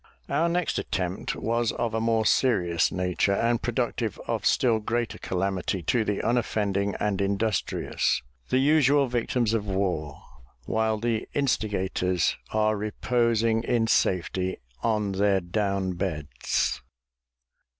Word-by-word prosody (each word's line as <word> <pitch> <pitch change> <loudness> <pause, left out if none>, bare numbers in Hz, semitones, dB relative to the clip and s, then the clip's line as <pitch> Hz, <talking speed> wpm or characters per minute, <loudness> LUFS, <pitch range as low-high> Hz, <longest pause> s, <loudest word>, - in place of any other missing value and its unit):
Our 160 +4 +2
next 175 0 0
attempt 90 0 -3
was 115 0 0
of 120 -2 -2
a 110 - 0
more 115 -1 +1
serious 90 -10 +2
nature, 90 +1 0
and 115 +2 +1
productive 120 -3 -2
of - - -1
still 115 -3 +3
greater 115 +2 -2
calamity 95 -1 -2
to 115 +7 +2
the 105 -2 -2
unoffending 100 -4 0
and 105 -2 0
industrious, 100 - 0 0.3
the 130 - +2
usual 145 0 +4
victims 120 -2 0
of 105 -2 -1
war, 90 -7 -2 0.4
while 110 +3 0
the 115 0 -2
instigators 95 - 0
are 110 0 +2
reposing 115 +1 +1
in 115 -1 +1
safety 95 -3 +1 0.2
on 105 -3 0
their 100 0 +2
down 95 0 -1
beds. 80 -5 -2
110 Hz, 120 wpm, -26 LUFS, 95-115 Hz, 0.4 s, usual